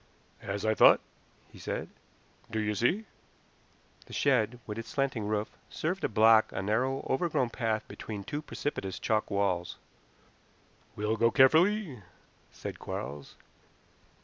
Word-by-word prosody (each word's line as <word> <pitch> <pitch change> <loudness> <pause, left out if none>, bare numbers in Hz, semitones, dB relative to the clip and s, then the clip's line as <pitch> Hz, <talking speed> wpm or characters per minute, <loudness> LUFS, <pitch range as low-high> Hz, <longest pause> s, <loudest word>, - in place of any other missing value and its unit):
"As 100 +1 -4
I 110 - +3
thought," - - +7 0.5
he - - -14
said. - - -4 0.6
"Do 110 -1 -2
you 105 0 0
see?" 145 - +1 1.0
The - - -12
shed, 110 +3 +2
with 105 +1 -5
its 115 - -7
slanting 130 -6 -1
roof, 105 0 -2
served 180 +5 -2
to - - 0
block 110 +1 +5
a 95 - -3
narrow, 125 +7 0
overgrown 130 -4 0
path 110 -3 -1
between 105 -3 -7
two 145 +8 -4
precipitous 100 -10 -4
chalk 110 -1 0
walls. 100 -3 -1 1.2
"We'll 105 +2 -1
go 115 +1 +4
carefully," 160 - +4 0.5
said - - -7
Quarles. 70 0 -6
110 Hz, 130 wpm, -30 LUFS, 105-135 Hz, 1.2 s, thought